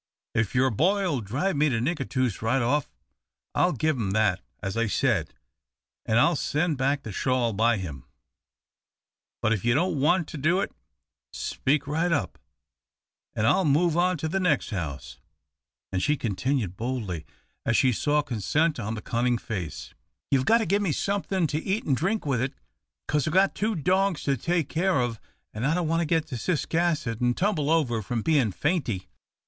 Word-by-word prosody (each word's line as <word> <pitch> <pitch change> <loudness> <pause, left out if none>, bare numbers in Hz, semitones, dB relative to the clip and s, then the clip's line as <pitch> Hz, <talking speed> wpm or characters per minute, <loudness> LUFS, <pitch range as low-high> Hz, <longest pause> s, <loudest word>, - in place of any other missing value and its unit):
If 110 0 0
your 130 +1 +3
boy'll 175 - +1
drive 135 - -1
me 150 +1 +3
to 120 -4 0
Nicatoos 130 - -1
right 120 +3 +1
off, 145 +4 +1 0.6
I'll 180 - +3
give 155 +2 0
him 110 -6 -2
that 105 -3 +2 0.2
as 95 0 -4
I 115 0 +1
said, - - 0 0.7
an' 110 - +2
I'll 170 +8 +4
send 150 0 0
back 140 +1 +1
the 110 - -6
shawl 125 +2 0
by 115 +2 +3
him. 75 -9 -6 1.4
But 110 - +3
if 105 - -2
you 120 0 +3
don't 165 -2 +1
want 165 +4 +2
to 150 - -6
do 170 +7 +2
it, - - -2 0.6
speak 145 +2 -1
right 160 +5 0
up, 155 - -1 1.0
an' 105 - +1
I'll 190 - +4
move 160 +2 +3
on 180 +1 +2
to 160 - -3
the 195 +5 -1
next 170 -10 +1
house, 80 -9 -5 0.7
and," 95 - -1
she 150 +9 +2
continued 110 -2 -1
boldly 110 -8 -3 0.4
as 115 - +2
she 130 - +4
saw 150 +5 +1
consent 145 - 0
on 110 0 -3
the 105 - -7
cunning 120 +1 +1
face, 90 -10 -6 0.4
"you've 135 -2 +3
got 225 - +5
to 225 - 0
give 200 +4 +1
me 195 -5 +1
somethin' 195 +1 0
to 155 0 -1
eat 200 +4 -1
an' 140 - +2
drink 190 - 0
with 135 -5 0
it, 135 +2 -2 0.5
'cause 150 -1 +1
I've 155 - -1
got 190 +1 +4
two 215 +1 -1
dogs 185 +2 +1
to 140 - +1
take 170 +3 0
care 180 -1 +1
of, 120 -3 -1 0.3
an' 110 - -4
I 150 +5 +2
don't 175 -2 0
want 165 +1 +1
to - - 0
get 160 -1 +1
to 130 - -4
Ciscasset 155 - 0
and 120 0 +1
tumble 180 -7 +1
over 135 -9 +2
from 115 +1 -3
bein' 140 -9 +2
fainty." 120 - -1
140 Hz, 185 wpm, -26 LUFS, 115-165 Hz, 1.4 s, got